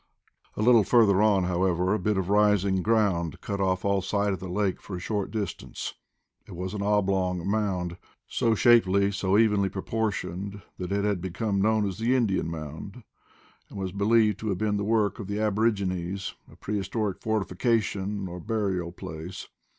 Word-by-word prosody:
A 105 - 0
little 120 -2 +6
further 100 -2 +4
on, 105 -3 +4
however, 90 +1 +1
a 110 - 0
bit 105 +2 0
of 95 -2 -1
rising 100 -2 +3
ground 95 -7 +1
cut 100 -1 -4
off 95 0 0
all 100 -1 +2
sight 100 +1 0
of 95 - -4
the 95 +1 -7
lake 95 0 -1
for 95 - -7
a - - -5
short 100 +2 -2
distance. 100 -4 -5 0.5
It - - -9
was 90 +2 -4
an 105 - -3
oblong 95 -3 +1
mound, 95 -4 -1 0.3
so 115 -1 +1
shapely, 100 -4 +4
so 100 0 +1
evenly 105 -3 +3
proportioned 100 -1 -3 0.2
that 90 0 -4
it 100 +1 0
had 100 -4 0
became 100 +2 -1
known 110 0 +2
as 95 +1 -5
the 120 +3 +2
Indian 100 -9 +1
Mound, 80 - -7 0.7
and - - -10
was 95 -1 -3
believed 105 +1 +3
to 110 - -3
have 95 - -1
been 105 +1 0
the 100 - -1
work 105 -1 +1
of 100 - -6
the 100 +1 -3
aborigines, 100 -4 0 0.2
a - - -15
prehistoric 100 -1 -3
fortification, 105 -1 -1
or 90 0 -7
burial 95 -4 -2
place. 80 +1 -8
100 Hz, 175 wpm, -27 LUFS, 95-105 Hz, 0.7 s, little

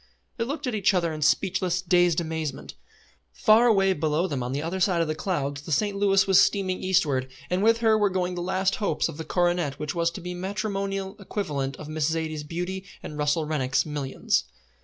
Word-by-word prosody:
They 230 - -1
looked 290 +3 -4
at 250 - -2
each 205 -2 +2
other 170 -3 +1
in 155 - -6
speechless, 180 +4 +1
dazed 175 -2 +3
amazement. 160 -3 -4 0.6
Far 220 - +5
away 195 -4 +4
below 155 +1 0
them 145 -8 -2
on 125 +1 -3
the 140 +3 -2
other 175 +4 -3
side 180 -1 +2
of 165 - +1
the 155 - -1
clouds 145 -5 -2
the 155 - -8
St. 205 +6 +1
Louis 195 -1 +3
was 195 0 +6
steaming 190 -3 +1
eastward, 145 -8 +1 0.2
and 180 +1 +1
with 230 +2 +3
her 220 -1 +4
were 205 -1 +3
going 180 -1 -1
the 175 - -4
last 190 +2 0
hopes 200 -8 0
of - - -8
the 160 - -5
coronet 175 -5 0
which 150 -1 -4
was 170 -1 +1
to 170 +3 -8
be 180 +1 -5
the 175 - -7
matrimonial 195 0 -3
equivalent 145 -10 -3
of 155 - -9
Miss 155 0 -1
Zaidie's 160 -1 -2
beauty 180 +5 -4 0.2
and 150 - -7
Russell 150 +2 0
Rennick's 135 -4 0
millions. 145 -3 -1
175 Hz, 210 wpm, -26 LUFS, 155-195 Hz, 0.6 s, was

